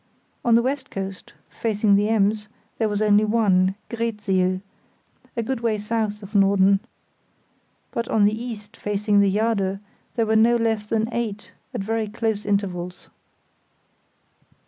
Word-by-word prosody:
On 235 Hz, -1 st, +4 dB
the 235 Hz, -, +4 dB
west 270 Hz, +1 st, -2 dB
coast, 195 Hz, -1 st, -6 dB
facing 210 Hz, -2 st, +1 dB
the 205 Hz, +2 st, +2 dB
Ems, 210 Hz, -1 st, +1 dB, 0.3 s
there 220 Hz, -2 st, +2 dB
was 205 Hz, +1 st, 0 dB
only 210 Hz, 0 st, +5 dB
one, 195 Hz, -4 st, +3 dB, 0.2 s
Greetsiel, 205 Hz, -5 st, 0 dB, 0.8 s
a 230 Hz, -, 0 dB
good 260 Hz, +2 st, -2 dB
way 230 Hz, -2 st, 0 dB
south 210 Hz, 0 st, -2 dB
of 200 Hz, +2 st, -11 dB
Norden. 195 Hz, -1 st, +4 dB, 1.1 s
But 235 Hz, 0 st, -2 dB
on 210 Hz, -2 st, +3 dB
the 205 Hz, -, +3 dB
east, 225 Hz, -2 st, -7 dB
facing 205 Hz, 0 st, +1 dB
the 200 Hz, -1 st, +4 dB
Jade, 200 Hz, -2 st, +1 dB, 0.4 s
there 230 Hz, -2 st, +2 dB
were 220 Hz, 0 st, +1 dB
no 230 Hz, +2 st, +5 dB
less 225 Hz, -2 st, 0 dB
than 220 Hz, 0 st, 0 dB
eight, 220 Hz, -3 st, -3 dB, 0.2 s
at -, -, -3 dB
very 220 Hz, +2 st, -1 dB
close 220 Hz, -1 st, -2 dB
intervals. 180 Hz, -3 st, -2 dB
210 Hz, 145 wpm, -23 LUFS, 200-225 Hz, 1.1 s, only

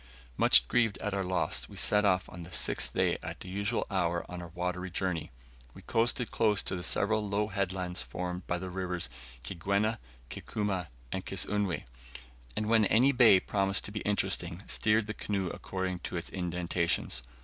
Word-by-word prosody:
Much -, -, +6 dB
grieved 115 Hz, -, +2 dB
at 105 Hz, -, -3 dB
our 100 Hz, -, 0 dB
loss, 90 Hz, -1 st, -1 dB
we -, -, -11 dB
set 105 Hz, 0 st, +3 dB
off 95 Hz, -2 st, +2 dB
on 90 Hz, -, -9 dB
the 85 Hz, +1 st, -10 dB
sixth -, -, +1 dB
day -, -, +2 dB
at -, -, -6 dB
the -, -, -8 dB
usual 100 Hz, +5 st, -1 dB
hour 85 Hz, -3 st, 0 dB
on 90 Hz, 0 st, -6 dB
our 85 Hz, -, -7 dB
watery 90 Hz, +2 st, -3 dB
journey. 90 Hz, -3 st, -2 dB, 0.5 s
We -, -, -12 dB
coasted 115 Hz, +1 st, +1 dB
close 105 Hz, -3 st, +2 dB
to -, -, -2 dB
the 90 Hz, -, -4 dB
several 105 Hz, +3 st, +1 dB
low 105 Hz, +1 st, 0 dB
headlands 95 Hz, -2 st, -1 dB
formed 90 Hz, 0 st, -5 dB
by 90 Hz, -, 0 dB
the 90 Hz, +1 st, -6 dB
rivers 90 Hz, -1 st, -3 dB, 0.3 s
Kigwena, 100 Hz, -, 0 dB, 0.3 s
Kikuma, 100 Hz, -5 st, -2 dB, 0.2 s
and 95 Hz, -, -2 dB
Kisunwe; 95 Hz, 0 st, -1 dB, 0.7 s
and 110 Hz, -, 0 dB
when 110 Hz, -1 st, +5 dB
any 125 Hz, +7 st, +5 dB
bay 120 Hz, -7 st, +7 dB
promised 95 Hz, 0 st, +1 dB
to -, -, -5 dB
be 105 Hz, -, -3 dB
interesting, 100 Hz, -3 st, +1 dB
steered 110 Hz, 0 st, +2 dB
the 110 Hz, -, -4 dB
canoe 100 Hz, -4 st, -2 dB
according 95 Hz, 0 st, -3 dB
to 90 Hz, -, -5 dB
its 85 Hz, -, -4 dB
indentations. 85 Hz, -6 st, -1 dB
95 Hz, 175 wpm, -30 LUFS, 90-105 Hz, 0.7 s, bay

